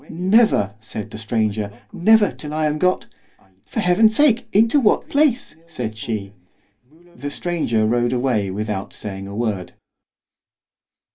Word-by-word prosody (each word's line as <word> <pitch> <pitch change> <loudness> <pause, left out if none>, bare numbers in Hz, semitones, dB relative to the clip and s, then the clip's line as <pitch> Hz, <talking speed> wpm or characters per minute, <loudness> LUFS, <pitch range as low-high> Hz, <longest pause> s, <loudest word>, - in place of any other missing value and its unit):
—never! 180 - +3
said 110 -1 -7
the - - -7
stranger, 110 -2 -1 0.2
never 210 +3 +4
till 150 0 -8
I 155 0 0
am 150 0 -1
got—For 95 - -4
Heaven's 215 +5 +4
sake, 245 -4 +3
into 225 +7 +4
what 225 -6 +2
place? 280 - +1
said 115 -9 -5
she——The 110 - -9
stranger 145 -9 -1
rode 120 +2 +1
away 120 -6 0
without 100 0 -4
saying 100 -2 -6
a 100 - -8
word. 105 -5 -3
120 Hz, 125 wpm, -21 LUFS, -, 0.2 s, never